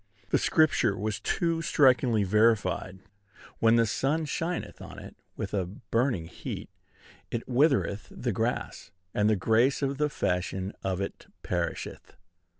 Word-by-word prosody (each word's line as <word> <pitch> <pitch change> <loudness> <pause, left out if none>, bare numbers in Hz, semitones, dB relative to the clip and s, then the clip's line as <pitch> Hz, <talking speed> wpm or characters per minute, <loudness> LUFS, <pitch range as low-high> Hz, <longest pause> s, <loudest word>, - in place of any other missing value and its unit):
the - - +4
Scripture 155 -10 +3
was 105 +2 -2
too 165 +7 0
strikingly 125 -8 +4
verified: 105 -2 +2 0.6
"When 115 0 +5
the 115 0 +4
sun 145 +8 0
shineth 165 +4 -3
on - - -9
it - - -10 0.2
with - - -4
a 95 -4 0
burning 115 0 -1
heat, - - -7 0.6
it 120 - -4
withereth 130 -6 +2
the - - -3
grass, - - -2 0.2
and 105 +1 +2
the 110 - +4
grace 115 +8 +2
of 140 +1 -1
the 150 0 +2
fashion 95 -3 -2
of 95 0 -1
it 100 - -6 0.2
perisheth." 85 -1 -4
115 Hz, 140 wpm, -28 LUFS, 100-140 Hz, 0.6 s, When